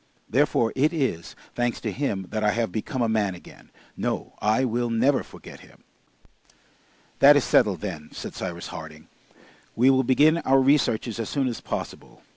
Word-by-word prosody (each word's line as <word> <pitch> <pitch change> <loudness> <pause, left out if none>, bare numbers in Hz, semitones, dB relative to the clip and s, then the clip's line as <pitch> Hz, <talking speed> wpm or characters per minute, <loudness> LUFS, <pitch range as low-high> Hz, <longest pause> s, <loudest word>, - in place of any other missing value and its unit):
Therefore 125 -3 +1
it 150 +5 +2
is, 130 - -2 0.2
thanks 120 -1 -1
to 110 - -3
him, 100 -5 -3
that 110 0 -2
I 105 - +2
have 115 -4 -1
become 120 - -3
a - - +1
man 105 -4 0
again. 85 - -16 0.3
No, - - -3
I 110 +5 +2
will 120 0 -1
never 125 +5 +2
forget - - -13
him!" - - -19 1.4
"That 145 +1 +8
is 140 - +2
settled, 95 -6 +2
then," 80 -7 -6
said - - -7
Cyrus 85 -2 -6
Harding. 80 0 -10 0.7
"We 130 +3 +5
will 130 0 +3
begin 150 +6 +3
our 135 -3 +3
researches 130 -5 +1
as 115 - -3
soon 140 -2 0
as 120 - -4
possible. - - -7
115 Hz, 170 wpm, -24 LUFS, 105-135 Hz, 1.4 s, That